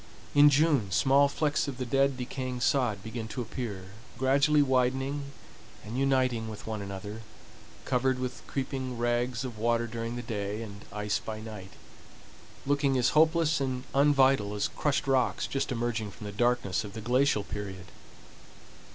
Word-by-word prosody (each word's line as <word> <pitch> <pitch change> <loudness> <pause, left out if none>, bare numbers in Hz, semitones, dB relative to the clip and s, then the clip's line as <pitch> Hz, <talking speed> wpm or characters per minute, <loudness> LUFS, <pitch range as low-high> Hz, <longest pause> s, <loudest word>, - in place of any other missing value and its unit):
In 145 +1 +8
June 145 -7 +3
small 135 +11 +4
flecks 145 +1 0
of 135 -3 -5
the 130 - -3
dead, 135 +1 +2
decaying 125 0 -4
sod 120 -7 +1
begin 110 0 -5
to 125 +3 -4
appear, 105 -6 -6 0.3
gradually 140 +3 +4
widening 135 +2 0 0.6
and 110 +3 -6
uniting 130 -4 +1
with 110 - -9
one 110 -2 -4
another, 100 +2 -6 0.6
covered 130 0 +1
with 125 0 -4
creeping 130 -2 -3
rags 120 +1 0
of 120 -4 -7
water 115 +1 +1
during 115 +1 -4
the 120 - -5
day, 105 -1 -3
and 100 -2 -10
ice 105 0 -1
by 110 -1 -6
night, 105 -4 -9 0.9
looking 140 -1 +2
as 125 -1 +3
hopeless 160 -1 +3
and 130 -2 -2
unvital 135 -7 +4
as 105 0 0
crushed 145 -1 -1
rocks 135 -2 +1
just 135 - -2
emerging 115 -3 -2
from 105 +2 -11
the 105 - -5
darkness 120 -2 +1
of 100 -2 -8
the 110 - -6
glacial 125 -1 +2
period. 95 -3 -6
125 Hz, 155 wpm, -29 LUFS, 110-135 Hz, 0.9 s, In